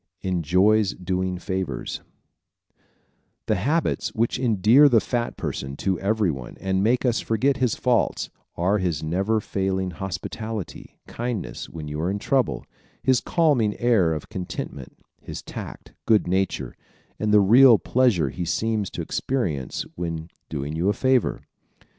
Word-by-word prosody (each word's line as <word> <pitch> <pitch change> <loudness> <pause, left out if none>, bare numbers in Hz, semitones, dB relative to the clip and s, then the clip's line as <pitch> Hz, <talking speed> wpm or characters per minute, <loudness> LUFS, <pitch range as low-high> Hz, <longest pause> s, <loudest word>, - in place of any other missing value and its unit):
Enjoys 95 +3 +2
Doing 90 0 -2
Favors 95 0 -4 0.7
¶ - - -55 0.7
The - - +1
habits 145 - 0
which 115 +2 0
endear 120 +4 +5
the 120 -4 +5
fat 120 +1 -2
person 70 0 -4
to 95 -3 -1
everyone 95 - -1
and 95 0 0
make 120 +4 +2
us 120 -2 +2
forget 130 +5 +1
his 125 -4 +1
faults 125 -2 0 0.2
are 95 +5 +1
his 85 -5 -1
never 95 +7 0
failing 95 -2 -2
hospitality, 95 +3 -6
kindness 120 -4 -4
when 80 -2 -7
you 75 +1 -4
are 85 - 0
in 100 - -1
trouble, 130 +3 0 0.4
his 130 -2 +3
calming 135 -11 +2
air 110 -9 +3
of 75 - -5
contentment, 90 -5 -6 0.2
his - - -7
tact, - - -9
good 110 -2 +4
nature 95 +2 -1 0.4
and 110 -1 0
the 105 - +7
real 115 +4 +7
pleasure 115 - +2
he 90 - -5
seems 110 +3 -1
to - - -5
experience 85 - -2
when 80 -1 -5 0.2
doing 75 0 -4
you 85 +5 +1
a - - +3
favor. 130 0 +1
100 Hz, 140 wpm, -24 LUFS, 90-115 Hz, 0.7 s, the